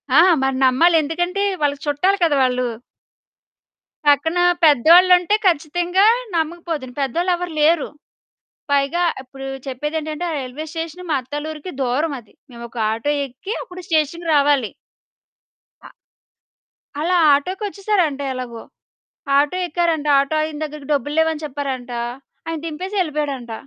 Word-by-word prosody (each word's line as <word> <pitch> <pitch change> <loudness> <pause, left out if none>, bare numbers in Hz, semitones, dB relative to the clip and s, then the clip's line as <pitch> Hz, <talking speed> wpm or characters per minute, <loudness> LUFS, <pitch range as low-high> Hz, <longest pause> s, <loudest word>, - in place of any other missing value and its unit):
ఆ! - - +8 0.2
మరి 270 -1 0
నమ్మాలి. 325 +7 +4
ఎందుకంటే 350 +6 -1 0.2
వాళ్ళకి 285 0 0
చుట్టాలు 370 +8 +2
కదా! 315 -3 +3
వాళ్ళు. 250 -1 +1 1.4
పక్కన 320 +5 +3 0.2
పెద్దవాళ్ళుంటే 355 - +6
ఖచ్చితంగా 350 +3 +2 0.3
నమ్మకపోదును. 325 -5 -3
పెద్దోళ్ళెవరు 345 +5 -1
లేరు. 310 0 +3 0.8
పైగా 285 +5 +2 0.2
ఇప్పుడు 270 +1 -10 0.2
చెప్పేదేంటంటే 300 +5 -4
ఆ - - -3
రైల్వే 265 +3 -6
స్టేషన్ 330 +2 -6
మా 300 - +2
అత్తాల్లూరికి 295 +5 -6
దూరమది. 260 -2 -2 0.2
మేమొక 235 0 -10
ఆటో 230 +6 -1 0.2
ఎక్కి 270 - -7
అప్పుడు 365 -5 -9
స్టేషన్‌కి 325 +1 0
రావాలి. 280 -5 +3 1.1
ఆ - - -12 1.1
అలా 355 +3 +1 0.2
ఆటోకొచ్చేసారంట 375 -1 -1
ఎలాగో! 245 -3 -6 0.8
ఆటో 295 +5 +1
ఎక్కారంట. 330 -3 0
ఆటో 280 +3 0
ఆయన 310 -1 -4
దగ్గరికి 300 -2 -9
"డబ్బులు 290 +1 -1
లేవు" 320 0 +4
అని 315 0 -7
చెప్పారంట. 265 -3 -4 0.6
ఆయన 330 0 -3
దింపేసి 360 +6 -5
యెళ్ళిపోయాడంట. 290 -8 -2
300 Hz, 115 wpm, -20 LUFS, 275-345 Hz, 1.4 s, ఆ